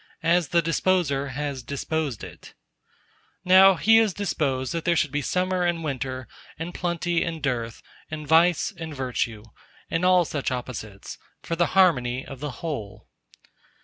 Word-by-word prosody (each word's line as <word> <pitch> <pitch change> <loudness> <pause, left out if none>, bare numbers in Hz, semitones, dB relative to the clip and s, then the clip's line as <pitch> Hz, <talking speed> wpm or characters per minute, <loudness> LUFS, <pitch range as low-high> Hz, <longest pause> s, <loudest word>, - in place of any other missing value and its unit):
As 170 0 +3
the 170 +3 +2
Disposer 165 -4 +1
has 140 0 -4
disposed 140 -1 -3
it. - - -11 0.9
Now 190 +1 +7
He 225 +6 +5
has 220 -5 +3
disposed 135 -10 -1
that 165 -1 -3
there 170 - +2
should 150 -3 +1
be 145 +1 -1
summer 185 +3 0
and 175 -2 0
winter, 130 -3 -4 0.3
and 165 +2 -5
plenty 175 0 -1
and 165 -1 -4
dearth, 120 -6 -3 0.3
and 155 -1 -6
vice 165 +4 +4
and 160 -3 -7
virtue, 125 -4 -2 0.5
and 165 - 0
all 180 -1 +5
such 145 -3 -2
opposites, 120 -5 -6 0.2
for 165 - -2
the 175 +1 +2
harmony 130 -9 +3
of 135 - -9
the 150 +1 -4 0.2
whole. 110 - -6
155 Hz, 150 wpm, -25 LUFS, 130-175 Hz, 0.9 s, Now